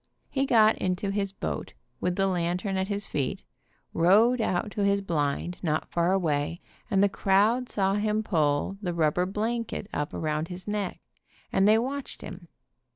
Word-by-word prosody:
He 270 Hz, 0 st, 0 dB
got 220 Hz, -3 st, +5 dB
into 185 Hz, +2 st, -1 dB
his 195 Hz, -1 st, -1 dB
boat, 80 Hz, -, -5 dB, 0.2 s
with 180 Hz, 0 st, 0 dB
the 195 Hz, -, +2 dB
lantern 180 Hz, +1 st, -1 dB
at 190 Hz, 0 st, 0 dB
his 205 Hz, 0 st, -2 dB
feet, 140 Hz, -3 st, -2 dB, 0.5 s
rowed 215 Hz, +9 st, +4 dB
out 205 Hz, 0 st, -1 dB
to 205 Hz, -, -1 dB
his 200 Hz, 0 st, +3 dB
blind 170 Hz, -1 st, -2 dB
not 155 Hz, -3 st, -1 dB
far 170 Hz, +1 st, +2 dB
away, 165 Hz, -3 st, 0 dB, 0.3 s
and 195 Hz, -3 st, +3 dB
the -, -, +6 dB
crowd 210 Hz, +6 st, +2 dB
saw 195 Hz, -1 st, +1 dB
him 210 Hz, +1 st, 0 dB
pull 155 Hz, +1 st, 0 dB
the 175 Hz, -4 st, -2 dB
rubber 165 Hz, +2 st, +2 dB
blanket 220 Hz, +1 st, -2 dB
up 145 Hz, 0 st, -2 dB
around 155 Hz, 0 st, -1 dB
his 180 Hz, +2 st, -8 dB
neck, 205 Hz, -3 st, -3 dB, 0.5 s
and 195 Hz, +1 st, +4 dB
they 215 Hz, +1 st, +6 dB
watched 265 Hz, +4 st, -4 dB
him. 175 Hz, -, -9 dB
195 Hz, 165 wpm, -27 LUFS, 170-210 Hz, 0.5 s, the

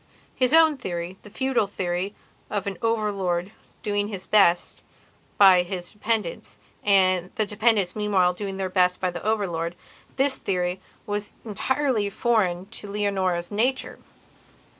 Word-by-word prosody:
His 255 Hz, -1 st, +2 dB
own 320 Hz, -2 st, +6 dB
theorythe 175 Hz, -5 st, -5 dB
feudal 260 Hz, -4 st, 0 dB
theory 185 Hz, 0 st, -3 dB, 0.3 s
of 205 Hz, -2 st, -2 dB
an 200 Hz, -1 st, -3 dB
over 225 Hz, -2 st, +1 dB
lord 185 Hz, -1 st, -2 dB, 0.3 s
doing 205 Hz, -1 st, 0 dB
his 195 Hz, -3 st, -6 dB
best 185 Hz, -5 st, +3 dB, 0.6 s
by 190 Hz, -3 st, +7 dB
his 180 Hz, 0 st, -5 dB
dependents, 210 Hz, -, -3 dB, 0.3 s
the 185 Hz, 0 st, +2 dB
dependents 210 Hz, -3 st, +1 dB
meanwhile 200 Hz, -4 st, +2 dB
doing 195 Hz, +1 st, -5 dB
their 190 Hz, -1 st, -1 dB
best 180 Hz, -1 st, +2 dB
for 185 Hz, -1 st, 0 dB
the 175 Hz, -, -6 dB
over 215 Hz, -1 st, +1 dB
lordthis 175 Hz, +10 st, -3 dB
theory 180 Hz, -1 st, -2 dB, 0.2 s
was 205 Hz, -1 st, -4 dB
entirely 235 Hz, 0 st, 0 dB
foreign 195 Hz, -5 st, +1 dB, 0.2 s
to 205 Hz, -, -9 dB
Leonora's 190 Hz, -4 st, -1 dB
nature. 245 Hz, +6 st, 0 dB
200 Hz, 130 wpm, -25 LUFS, 180-215 Hz, 0.6 s, by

